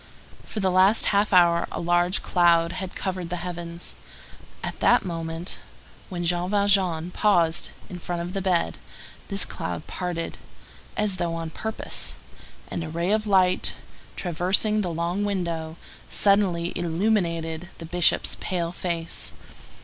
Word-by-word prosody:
For 220 - -5
the 190 -2 +2
last 190 +4 +5
half 205 +1 +3
hour 170 -2 +5
a - - -3
large 175 +2 +2
cloud 170 -2 +4
had 185 0 -5
covered 185 -3 -3
the 180 - -2
heavens. 175 -1 -6 0.7
At - - -4
the - - +6
moment 165 0 -4 0.5
when 175 -3 -3
Jean 175 +1 +1
Valjean 190 -5 +2
paused 175 -6 +2 0.2
in 180 -3 -7
front 175 0 -3
of 175 +1 -6
the 195 - -2
bed, 85 - +1 0.5
this - - 0
cloud 85 0 -5
parted, 175 -2 -4 0.6
as 210 -3 +1
though 170 -1 -1
on 165 -1 -4
purpose, 220 +6 -3 0.5
and 170 - -4
a 160 - -5
ray 170 +4 -1
of 215 0 +1
light, 185 -2 +4 0.4
traversing 190 +5 +2
the 185 - -2
long 170 +4 -1
window, 170 -5 -2 0.3
suddenly 190 -4 +2
illuminated 170 -2 0
the 165 - -8
Bishop's 175 +1 +2
pale 170 -2 -2
face. 170 -2 -4
175 Hz, 140 wpm, -25 LUFS, 170-190 Hz, 0.7 s, the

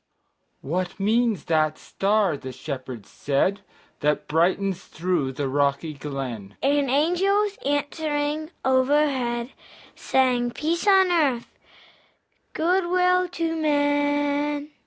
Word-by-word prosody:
"What 180 +6 -3
means 220 -2 +1
that 155 -1 +1
star," 200 -4 0
the 130 -2 -7
Shepherds 130 -4 -7
said, 145 +8 0 0.4
"That 150 0 0
brightens 180 +4 +1
through 160 -5 -2
the 140 +1 -2
rocky 140 +3 0
glen?" 130 -8 -6
And 280 -1 +2
angels, 385 +8 +1
answering 290 +1 -1 0.2
overhead, 260 -2 +1 0.4
Sang, 250 -2 +1
"Peace 330 - -2
on 380 -2 +5
earth, 280 -9 0 1.0
good 355 +2 +1
will 365 0 +3
to 330 -2 -2
men!" 290 -1 0
260 Hz, 100 wpm, -24 LUFS, -, 1.0 s, on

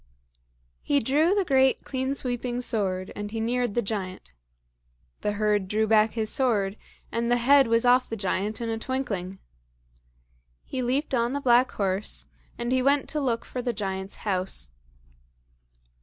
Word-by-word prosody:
He 285 -1 +2
drew 300 - +2
the 400 -2 +1
great 265 -3 +3
clean 265 +1 -2
sweeping 245 -1 -2
sword, 190 -6 -1
and 205 0 -5
he 225 +1 -4
neared 240 -1 0
the 240 - +1
giant. 190 - -5 0.9
The 210 - -1
herd 210 -2 +1
drew 215 +3 +1
back 220 0 +3
his 220 -2 -1
sword, 215 -8 +1 0.4
and 235 0 -1
the 245 - +4
head 270 +2 +5
was 230 +1 +2
off 250 +1 +4
the 225 - -3
giant 200 +2 -1
in 230 - -2
a 225 - -2
twinkling. 210 -8 -3 1.3
He 260 - -4
leaped 265 +4 -1
on 240 0 +1
the 285 - -1
black 250 -1 +4
horse, 195 0 -1 0.3
and 240 0 -3
he 260 0 +3
went 280 +2 +2
to 300 - -1
look 235 -4 -1
for 250 - -5
the 245 -1 -1
giant's 190 -2 -4
house. 185 - -1
235 Hz, 160 wpm, -26 LUFS, 205-260 Hz, 1.3 s, head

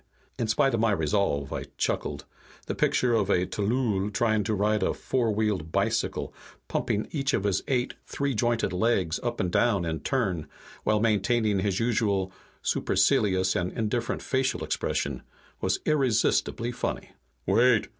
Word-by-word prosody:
In 115 - 0
spite 135 +5 +2
of 115 - +1
my 115 0 +3
resolve, 80 -5 0
I - - -4
chuckled. - - -2 0.4
The - - -3
picture 125 -2 +2
of 105 -4 +1
a 90 -2 +3
tllooll 105 -1 0
trying 110 0 +1
to 110 - 0
ride 105 +2 +1
a - - +1
four 120 -4 0
wheeled 105 -7 -1
bicycle, - - -1 0.3
pumping 105 - -1
each 135 -3 0
of - - -1
his 100 -2 +1
eight 125 -2 0
three 140 -1 -1
jointed 115 -3 0
legs 90 -4 +1
up 120 -1 -3
and 90 - 0
down 100 -6 +2
in 80 -1 -2
turn, 95 - -1 0.4
while 105 0 +2
maintaining 105 -1 +2
his 95 -1 0
usual 105 -5 +1 0.3
supercilious 95 -2 +2
and 90 +1 -1
indifferent 115 +2 -2
facial 130 0 0
expression, 70 -3 -2 0.4
was - - 0
irresistibly 125 -4 +1
funny. - - -4 0.3
"Wait!" 120 -1 +4
105 Hz, 150 wpm, -27 LUFS, 95-120 Hz, 0.4 s, Wait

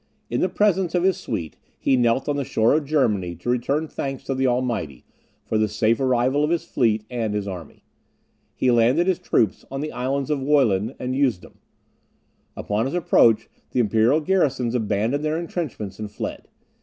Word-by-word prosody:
In 120 - 0
the 185 - +2
presence 190 -2 +1
of 175 - +2
his 190 -1 +3
suite, 85 -9 -5 0.2
he 135 - +2
knelt 120 +1 +2
on 145 - 0
the 140 - -1
shore 115 -2 +2
of 150 0 +1
Germany 105 - 0
to 90 +9 -3
return 140 +6 0
thanks 135 -3 -5
to 135 - -2
the 130 0 +1
Almighty 120 - -2 0.4
for 110 - 0
the 110 - +2
safe 110 +2 +1
arrival 130 +2 +2
of 150 - +1
his 170 0 0
fleet 110 -8 +1
and 115 -4 -2
his 100 -1 -2
army. 90 -5 -8 0.7
He 130 - +2
landed 120 +8 +3
his 185 -2 +1
troops 110 -4 +1
on 135 0 -4
the 155 - -4
Islands 135 +2 -2
of 150 - +1
Wollin 130 -6 +2
and 125 +1 -3
Usedom; 120 - -1 1.0
upon 105 +3 -1
his 140 - -4
approach, 115 -10 +4 0.3
the - - +1
imperial 115 +6 +3
garrisons 140 -9 +1
abandoned 110 +4 0
their 155 +1 0
entrenchments 145 - -5
and 105 -1 -5
fled. 105 - -6
125 Hz, 180 wpm, -23 LUFS, 110-145 Hz, 1.0 s, approach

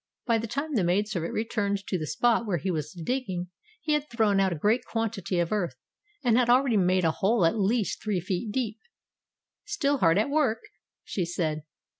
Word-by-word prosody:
By 230 -2 +2
the 230 - -4
time 285 +6 -3
the 215 -8 +2
maid 185 +4 +2
servant 175 -6 -3
returned 200 -3 -1
to - - -2
the 155 -4 -2
spot 235 - +2
where 185 -4 +1
he 185 +4 -2
was 155 -2 -3
digging, 180 -2 -3 0.3
he 310 -7 -1
had 300 0 0
thrown 215 -4 +2
out 190 -1 +3
a - - -1
great 210 +10 +2
quantity 225 -5 -2
of 170 -1 0
earth, 180 -11 -1 0.5
and 240 -1 +4
had 240 -1 +2
already 250 -1 +4
made 185 -2 +3
a 160 - +4
hole 195 +2 +2
at 215 +7 +2
least 210 +1 0
three 210 -4 -1
feet 185 +5 -3
deep. 225 -2 -2 0.8
"Still 305 -10 0
hard 165 -3 +4
at 220 +7 +1
work?" 280 -7 +2 0.4
she 185 - -2
said. 165 -3 -2
210 Hz, 200 wpm, -27 LUFS, 180-240 Hz, 0.8 s, and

